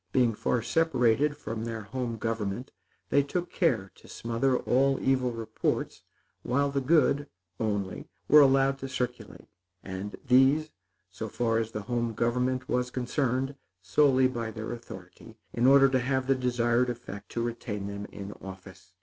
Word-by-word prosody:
Being 120 -2 +3
far 115 +2 -1
separated 145 -2 +2
from 115 -6 -5
their 115 -2 -4
home 120 +1 -4
government, 115 +2 -3 0.4
they 140 - +5
took 175 +5 -3
care 110 - +1
to - - -18
smother 120 +3 0
all 135 +2 +2
evil 130 -2 +1
reports, 115 -1 -3 0.4
while 140 +3 0
the 140 0 0
good, 145 0 +3 0.3
only, 105 -4 -2 0.2
were 150 +1 +8
allowed 135 0 +4
to 135 - -5
circulate; 125 -3 -4 0.4
and 95 +2 -6
these, 135 +5 +4 0.4
so - - -5
far 115 -2 0
as 115 0 -3
the 105 -1 -5
home 120 -1 -2
government 125 +3 0
was 125 0 0
concerned, 130 +1 -1 0.3
solely 130 +2 +4
by 120 -3 -4
their 110 0 -6
authority, 115 -1 -10 0.2
in 120 +2 +2
order 135 0 +7
to 130 0 +2
have 130 +1 0
the 135 - +3
desired 125 -1 +1
effect 115 -4 -7
to 115 - -1
retain 115 -4 -4
them 100 0 -5
in 100 0 -7
office. 95 0 -11
120 Hz, 155 wpm, -28 LUFS, 110-135 Hz, 0.4 s, were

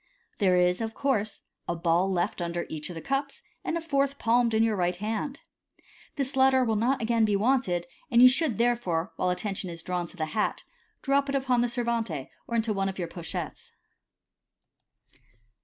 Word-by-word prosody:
There 190 -4 +4
is, 180 +2 +3
of 225 0 -3
course, 220 -7 -1 0.2
a 170 - -1
ball 170 +3 +2
left 180 +1 -1
under 170 0 -2
each 150 -1 -5
of 175 - -7
the 165 - -6
cups, 275 +1 -2 0.2
and 335 - -1
a - - -3
fourth 280 -3 0
palmed 235 -1 +2
in 220 - +4
your 225 -2 +2
right 180 -1 0
hand. 220 +8 -3 0.7
This 275 -1 -2
latter 265 0 +5
will 225 -3 +1
not 240 +4 +1
again 230 0 +2
be 210 -2 +3
wanted, 200 -6 +1 0.2
and 235 - +4
you 250 - +10
should 260 - +2
therefore, 230 -8 0
while 185 - +1
attention 195 0 -2
is 165 -1 -7
drawn 180 -1 -2
to 185 - -13
the 155 - -1
hat, 215 - 0 0.4
drop 275 0 +2
it 275 - 0
upon 260 -3 +2
the 245 - +2
servante, 230 - -2 0.2
or 235 - -3
into 225 -1 +1
one 195 -1 0
of 195 - -7
your 175 -3 -2
pochettes. 170 -1 -6
220 Hz, 190 wpm, -27 LUFS, 180-255 Hz, 0.7 s, you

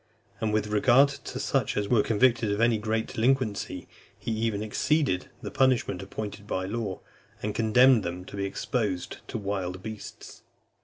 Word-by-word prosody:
And 110 - 0
with 105 0 +1
regard 120 +6 +5
to 140 - -7
such - - 0
as 105 -1 0
were 110 0 +4
convicted 115 0 +2
of 100 - -1
any 115 -1 +3
great 110 +1 -1
delinquency, 110 -7 0 0.3
he 115 - -4
even 110 -2 -1
exceeded 135 - 0
the - - -5
punishment 130 -8 +2
appointed 105 +1 -6
by 95 -2 -2
law, 100 -2 -3 0.4
and 105 - -1
condemned 120 +2 +5
them 90 0 -5
to 100 - -9
be 100 0 -2
exposed 100 -3 -2
to - - -4
wild 95 -3 -3
beasts. 110 -2 -9
110 Hz, 160 wpm, -27 LUFS, 100-120 Hz, 0.4 s, regard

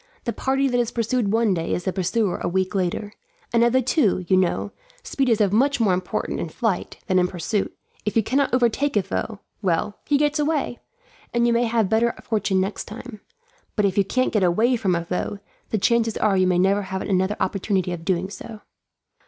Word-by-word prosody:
The 235 - -2
party 270 +1 +1
that 245 -2 +1
is 240 -2 +1
pursued 230 -2 0
one 225 -2 +3
day 165 -2 -1
is 180 - -4
the 185 - -1
pursuer 190 +1 0
a - - -2
week 185 +2 0
later; 195 +2 -2 0.4
and 235 0 +4
of 235 - +4
the 260 +1 +3
two, 225 - +2
you 190 - +4
know, 185 -2 +1 0.3
speed 270 -2 0
is 225 -2 +3
of 205 -2 +2
much 275 +4 +3
more 210 -5 +3
importance 180 0 -2
in 170 - -4
flight 215 +1 -2
than 185 -1 +2
in 180 - +3
pursuit. 190 +3 -2 0.3
If 210 - -2
you 225 - +4
cannot 275 +6 +1
overtake 250 +2 +2
a 200 - +2
foe, 200 +2 -4 0.2
well, 190 +1 -1
he 290 - +3
gets 295 +1 +1
away, 295 -5 0 0.6
and 235 0 +3
you 235 - +3
may 235 +1 +2
have 225 -3 +1
better 225 +3 +2
fortune 210 -4 0
next 195 +2 -2
time; 225 0 -9 0.5
but 210 - +2
if 190 -2 +1
you 200 - +4
can't 255 +6 0
get 210 - +2
away 215 +8 +3
from 195 -6 +1
a 170 0 -2
foe, 180 +3 -3 0.3
the 220 - 0
chances 230 +2 +2
are 210 -2 +2
you 185 -1 +3
may 180 -1 +2
never 195 +3 +3
have 190 -1 -4
another 190 +1 0
opportunity 190 -1 0
of 175 -2 -5
doing 185 +1 -1
so." 220 0 -9
210 Hz, 215 wpm, -23 LUFS, 185-235 Hz, 0.6 s, and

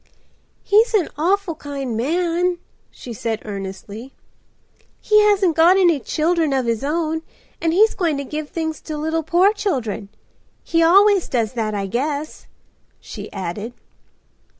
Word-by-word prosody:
"He's 445 +3 +3
an 380 -6 +2
awful 365 +4 0
kind 280 -5 -5
man," 345 +7 0 0.3
she 240 - -10
said 225 0 -3
earnestly. 200 +4 -7 0.8
"He 425 0 +4
hasn't 390 -5 +3
got 340 +4 +5
any 355 -3 +5
little - - -19
children 320 0 +1
of 260 -2 0
his 230 +1 -1
own, 320 +2 -1 0.4
and 330 - +1
he's 425 +6 +4
going 330 -6 0
to 280 - -3
give 300 +2 -5
things 320 -2 -4
to 310 -2 -6
little 320 +2 -1
poor 355 +6 +3
children. 260 - -3 0.5
He 330 - +1
always 390 +3 +5
does 230 -3 -1
that, 220 -3 -2
I 200 -1 -2
guess," 285 +8 -3 0.5
she - - -9
added. 200 +6 -5
310 Hz, 145 wpm, -20 LUFS, 240-355 Hz, 0.8 s, got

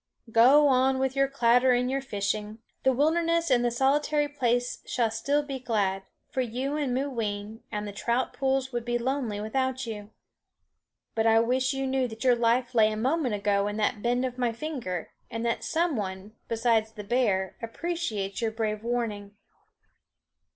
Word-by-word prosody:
"Go 265 +6 +6
on 265 0 +3
with 265 0 -1
your 275 0 +3
clatter 250 -1 +4
and 250 +1 +1
your 275 0 0
fishing. 210 -2 -3 0.2
The 265 - +4
wilderness 330 +4 +2
and 245 -1 +4
the 240 - +2
solitary 290 +4 +2
place 245 -4 -1
shall 235 -3 0
still 285 +6 0
be 275 -2 -5
glad, 205 -6 0 0.3
for 260 - 0
you 255 +4 -2
and 290 -4 -1
Mooween, 225 -5 -3
and 210 0 -3
the - - -5
trout 235 +5 -1
pools 265 -1 0
would 240 -1 -2
be 240 0 0
lonely 240 -4 -2
without 260 +4 -1
you. 210 -2 -7 1.0
But 225 0 +1
I 225 0 +6
wish 255 +3 +1
you 270 0 -1
knew 265 -1 +1
that 220 0 -8
your 255 -1 +5
life 240 +2 +1
lay 220 -2 +4
a 215 - -3
moment 260 0 0
ago 200 0 +1
in 205 0 -3
the 215 +3 +2
bend 240 +4 0
of 255 0 -5
my 245 -2 +1
finger, 230 - -5 0.2
and 230 +1 -4
that 235 - -1
some 330 -1 0
one, 195 0 -5
besides 225 -1 +1
the 210 -1 -8
bear, 200 -5 0
appreciates 230 - -3
your 225 - +1
brave 220 -1 -3
warning." 215 -4 -3
240 Hz, 175 wpm, -27 LUFS, 220-265 Hz, 1.0 s, Go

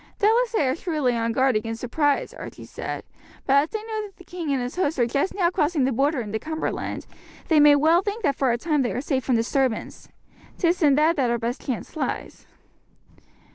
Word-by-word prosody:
"Doubtless 455 +3 +3
they 300 -11 +2
are 255 - +1
shrewdly 305 -8 -1
on 230 0 0
guard 260 +1 +2
against 225 +1 -2
surprise," 285 +4 0
Archie - - -9
said; - - -6 0.4
"but 270 - +2
as 290 +3 +3
they 435 -1 -4
know 435 -1 -4
that 390 - -21
the - - -14
king 345 -4 -5
and 275 - +1
his 245 +1 -4
host 335 -4 0
are 240 - +3
just 275 +9 -1
now 355 -3 +2
crossing 310 -5 +1
the 265 - +2
Border 275 +3 +1
into 220 -1 -4
Cumberland, 315 +3 -4 0.4
they 315 -2 +5
may 295 0 +7
well 320 +4 +4
think 420 +3 -4
that 285 -5 +2
for 265 -3 +1
a 235 - +1
time 300 +2 0
they 245 - -1
are - - -2
safe 265 -1 -1
from 255 - +1
disturbance. 235 +1 -1 0.5
'Tis 350 0 +1
in 290 -3 +5
that 310 +3 +3
that 255 -4 +2
our 235 - +1
best 235 +2 -4
chance 255 +3 -5
lies." 315 - -4
285 Hz, 215 wpm, -24 LUFS, 250-340 Hz, 0.5 s, may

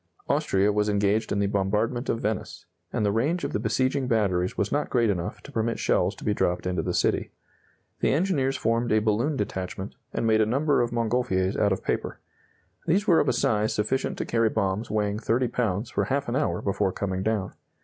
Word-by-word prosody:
Austria 100 +2 +2
was 105 0 +1
engaged 105 +2 +1
in - - +1
the 100 - +2
bombardment 105 +5 0
of 115 - 0
Venice, 110 -2 -3 0.3
and 105 - 0
the 100 - +2
range 145 - 0
of - - -3
the - - 0
besieging 130 +5 0
batteries 95 -6 +1
was 105 - 0
not 145 - 0
great 120 -4 +2
enough 90 -3 -4
to 145 - -11
permit 115 -2 -1
shells 90 +4 +1
to - - -12
be 105 - +1
dropped 90 -3 0
into 90 -2 0
the - - -2
city. - - +1 0.7
The - - +2
engineers 140 -4 +1
formed 115 +1 0
a 110 - +4
balloon 110 +7 +1
detachment, 95 -2 -4 0.2
and - - -2
made 110 -1 +4
a - - +4
number 140 +4 +2
of 120 - 0
Montgolfiers 115 -5 0
out 100 - +2
of 95 - -1
paper. - - -2 0.7
These 190 +5 +2
were 175 -6 +5
of - - +2
a - - +2
size 110 -5 +1
sufficient 130 +6 -1
to - - -2
carry 115 -1 +2
bombs 105 +1 -1
weighing 105 0 0
30 120 +2 +1
pounds 110 -3 -1
for - - 0
half 140 +1 -1
an 120 - -2
hour 150 +2 0
before 100 -1 0
coming 95 -1 -3
down. 105 -2 -1
110 Hz, 210 wpm, -26 LUFS, 100-125 Hz, 0.7 s, were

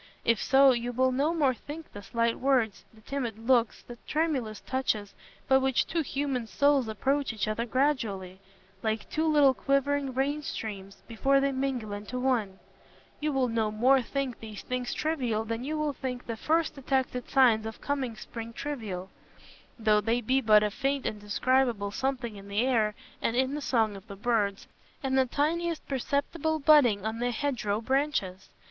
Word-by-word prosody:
If 230 -2 +3
so, 270 0 +6
you 240 0 -1
will 260 +2 +2
no 280 +5 +1
more 295 -6 +2
think 305 +6 -10
the 205 - -8
slight 230 +3 0
words, 255 -6 +1
the 220 - -19
timid 240 -3 -4
looks, 235 0 +1
the 240 -1 -11
tremulous 275 -9 -1
touches, 220 -6 -2 0.3
by 265 - +6
which 265 -1 +2
two 335 - -1
human 270 -5 -2
souls 280 +3 +2
approach 270 +6 0
each 215 -1 -2
other 230 +3 -2
gradually, 220 -9 -1 0.4
like 220 -1 -2
two 315 +1 0
little 290 -3 +5
quivering 275 0 0
rain 285 +3 0
streams, 200 -8 -6
before 270 +4 +2
they 275 0 +1
mingle 260 -5 -2
into 205 +5 -5
one—you 250 +4 -4
will 265 -2 +1
no 225 -2 0
more 255 +5 +4
think 265 0 -3
these 215 -2 -8
things 250 -1 -3
trivial 250 -9 -1
than 230 +2 -3
you 305 +3 -2
will 305 -1 -1
think 250 -2 -5
the 230 - -4
first 320 +7 +1
detected 265 -3 -2
signs 230 -5 +4
of 220 - -8
coming 270 -5 -2
spring 230 +1 -8
trivial, 210 -11 -5 0.7
though 215 -2 +3
they 230 +3 +1
be 255 +3 +1
but 215 -3 +6
a 210 - 0
faint 275 +4 -1
indescribable 215 +1 0
something 250 -2 -2
in 200 0 -11
the 200 +2 0
air 220 -5 +2 0.3
and 230 - 0
in 260 +2 +1
the 295 - -3
song 225 -6 +1
of 195 +2 -12
the 200 - -8
birds, 205 -2 0 0.4
and 265 -1 0
the 265 -1 +3
tiniest 330 +5 -1
perceptible 285 +4 -1
budding 275 -9 +5
on 220 +1 -2
the 245 +1 0
hedge 260 0 -2
row 205 0 0
branches. 260 -7 -1
250 Hz, 175 wpm, -28 LUFS, 220-275 Hz, 0.7 s, so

